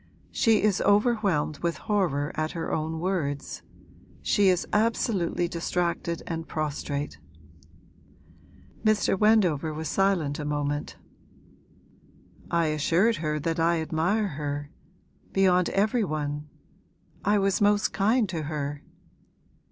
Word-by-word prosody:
She 225 -3 +3
is 205 -2 +2
overwhelmed 205 - +2
with 170 -1 -1
horror 170 -9 0
at 155 0 -2
her 165 - -3
own 160 +1 -2
words; 160 -6 -2 0.6
she 205 -2 +3
is 180 -1 +1
absolutely 210 -5 +1
distracted 170 0 -2
and 165 -1 -4
prostrate.' 145 - -3 1.6
Mr. 215 -2 +3
Wendover 185 -8 +3
was 155 0 -4
silent 180 -7 +1
a - - -3
moment. 145 0 -2 1.5
'I 170 -1 +2
assured 165 +9 +2
her 150 -1 -2
that 165 +2 -1
I 165 0 +2
admire 175 +7 0
her 145 -1 -4 0.6
beyond 180 -2 +3
every 215 +4 +1
one. 150 -3 -3 0.7
I 205 +1 +3
was 195 0 +1
most 205 0 +3
kind 215 +3 +2
to 170 -3 -3
her.' 145 -1 -4
170 Hz, 115 wpm, -27 LUFS, 150-200 Hz, 1.6 s, She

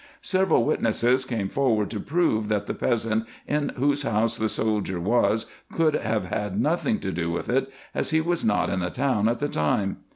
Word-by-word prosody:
Several 185 -10 +2
witnesses 120 +3 +1
came 115 -6 -2
forward 110 -5 +1
to 105 - -3
prove, 140 - +1
that 105 -1 0
the - - -3
peasant, 115 -2 0 0.2
in 150 0 0
whose 140 +2 +1
house 115 -3 +1
the 110 0 0
soldier 105 -5 -1
was, 110 +3 +2 0.3
could 160 -2 +2
have 110 -7 -1
had 100 +1 -3
nothing 175 - +1
to 95 - -2
do 85 -1 -2
with 85 - -3
it, 135 +2 +1 0.2
as - - -1
he 160 - +3
was 170 +1 -1
not 105 - +1
in 95 - 0
the 90 0 -1
town 120 -2 +1
at 120 - 0
the 145 - -1
time. 95 - 0
115 Hz, 195 wpm, -25 LUFS, 105-140 Hz, 0.3 s, he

